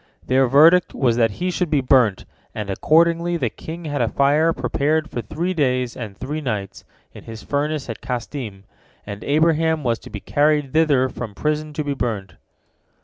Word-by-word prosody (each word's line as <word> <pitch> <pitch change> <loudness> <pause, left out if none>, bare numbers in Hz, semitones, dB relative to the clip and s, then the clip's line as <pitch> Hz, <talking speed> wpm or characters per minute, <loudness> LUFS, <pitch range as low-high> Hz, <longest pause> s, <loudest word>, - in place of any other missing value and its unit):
Their 130 +1 +3
verdict 160 +7 +5
was 120 -4 +2
that 115 -2 +3
he 180 +1 -1
should 180 -1 -1
be 150 -2 +2
burnt, 125 -6 +3 0.3
and, 105 -2 -4
accordingly, 170 - +2
the 120 -8 -1
king 165 +7 -8
had 145 -3 -2
a 115 - +1
fire 145 +6 +3
prepared 150 +3 0
for 120 - -3
three 165 - -3
days 125 -6 0
and 105 -5 -7
three 150 +4 -4
nights, 105 -8 -4 0.3
in - - -12
his 115 -1 -9
furnace 145 0 -2
at 115 - -7
Kasdim, 120 -4 -5 0.4
and 100 0 -7
Abraham 160 +1 +2
was 115 -2 0
to - - -12
be 105 - -6
carried 150 +2 +1
thither 150 -5 +3
from 115 -4 -7
prison 150 +2 -2
to 150 - -2
be 145 -1 -2
burnt. 105 -8 -3
140 Hz, 180 wpm, -21 LUFS, 120-155 Hz, 0.4 s, verdict